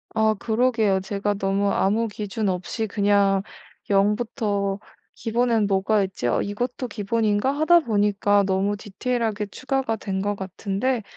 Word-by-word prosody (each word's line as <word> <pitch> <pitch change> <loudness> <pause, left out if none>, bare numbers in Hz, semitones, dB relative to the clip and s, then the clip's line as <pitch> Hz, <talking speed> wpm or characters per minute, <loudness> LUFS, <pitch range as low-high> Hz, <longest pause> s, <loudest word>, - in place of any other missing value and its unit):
아 220 0 +3
그러게요. 225 -4 +2
제가 200 +1 -2
너무 195 +1 0
아무 220 +4 +1
기준 210 0 -3
없이 185 +4 -3
그냥 200 -1 +2 0.5
'0 200 +1 +3
부터 205 -4 -2 0.4
기본에는 230 -2 +1
뭐가 200 +1 +2
있지? 190 -10 -3
아 120 - +1
이것도 245 +5 -3
기본인가?' 215 +2 0
하다 315 +4 +4
보니까 205 -4 +2
너무 195 +2 0
디테일하게 220 0 -2
추가가 260 +1 -2
된 195 -2 -3
것 205 +1 -1
같은데 200 +5 -2
205 Hz, 295 characters per minute, -24 LUFS, 195-225 Hz, 0.5 s, 하다